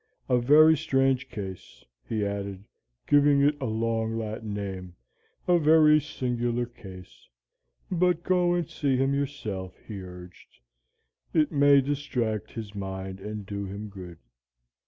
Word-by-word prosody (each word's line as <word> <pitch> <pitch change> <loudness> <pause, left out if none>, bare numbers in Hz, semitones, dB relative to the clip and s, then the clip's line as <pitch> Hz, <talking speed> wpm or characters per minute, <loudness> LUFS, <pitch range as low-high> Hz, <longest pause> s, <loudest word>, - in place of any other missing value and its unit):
A 125 -1 +3
very 155 +6 +6
strange 135 -2 +1
case,' 95 -5 -8 0.2
he 105 -2 -1
added, 100 -1 -4 0.4
giving 145 -1 +5
it 145 +1 +3
a 130 - -1
long 115 0 -1
Latin 110 -1 -5
name, 95 -3 -5 0.5
'a 175 -1 +4
very 155 -1 +6
singular 120 -3 -2
case. 95 -6 -13 0.6
But 180 -1 +1
go 180 -1 +2
and 175 -3 -1
see 140 -4 0
him 135 +1 +1
yourself,' 110 -10 -4
he 105 -4 -6
urged; 90 -1 -12 0.8
'it 155 -2 +3
may 140 -2 +5
distract 130 -7 -2
his 110 -3 -7
mind 95 -1 -6
and 105 +1 -6
do 100 0 -4
him 100 +2 -7
good?' 90 -4 -10
115 Hz, 135 wpm, -27 LUFS, 100-145 Hz, 0.8 s, very